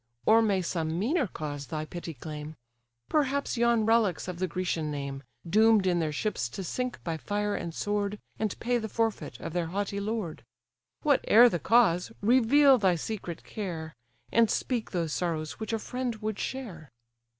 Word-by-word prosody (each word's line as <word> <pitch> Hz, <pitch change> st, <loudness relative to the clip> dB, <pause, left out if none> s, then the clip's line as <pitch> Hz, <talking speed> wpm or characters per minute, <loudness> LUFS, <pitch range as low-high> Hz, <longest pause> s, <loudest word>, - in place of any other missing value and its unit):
Or 225 Hz, +1 st, +6 dB
may 200 Hz, -4 st, +1 dB
some 165 Hz, -2 st, -2 dB
meaner 260 Hz, -, +1 dB
cause 145 Hz, -5 st, -6 dB
thy 155 Hz, -1 st, -3 dB
pity 170 Hz, 0 st, -7 dB
claim? 150 Hz, +3 st, -7 dB, 0.5 s
Perhaps 280 Hz, -2 st, 0 dB
yon 235 Hz, -2 st, +3 dB
relics 220 Hz, -7 st, +2 dB
of 180 Hz, -2 st, -5 dB
the 185 Hz, -, 0 dB
Grecian 170 Hz, -2 st, -2 dB
name, 140 Hz, -2 st, -4 dB, 0.3 s
Doom'd 215 Hz, +2 st, +5 dB
in 175 Hz, -2 st, +2 dB
their 160 Hz, -2 st, 0 dB
ships 150 Hz, -, -2 dB
to 195 Hz, -, -6 dB
sink 250 Hz, +7 st, -3 dB
by 165 Hz, -2 st, -2 dB
fire 205 Hz, +5 st, -1 dB
and 170 Hz, -, -3 dB
sword, 205 Hz, +3 st, -1 dB, 0.2 s
And 215 Hz, -3 st, -2 dB
pay 245 Hz, +1 st, +1 dB
the 220 Hz, -1 st, -5 dB
forfeit 210 Hz, -, -2 dB
of 165 Hz, -, -6 dB
their 175 Hz, -2 st, -1 dB
haughty 200 Hz, +3 st, -2 dB
lord? 205 Hz, -6 st, -3 dB, 0.6 s
Whate'er 245 Hz, -5 st, +6 dB
the 175 Hz, -, -2 dB
cause, 205 Hz, -2 st, +3 dB
reveal 260 Hz, +4 st, +5 dB
thy 190 Hz, -4 st, +3 dB
secret 175 Hz, -1 st, -5 dB
care, 165 Hz, -7 st, -5 dB, 0.4 s
And 230 Hz, -1 st, +4 dB
speak 240 Hz, -4 st, -1 dB
those 165 Hz, -4 st, -2 dB
sorrows 160 Hz, -3 st, -2 dB
which 220 Hz, -, -4 dB
a 225 Hz, -, +1 dB
friend 250 Hz, +1 st, -3 dB
would 215 Hz, -1 st, -4 dB
share." 190 Hz, -, -5 dB
200 Hz, 170 wpm, -28 LUFS, 165-225 Hz, 0.6 s, Or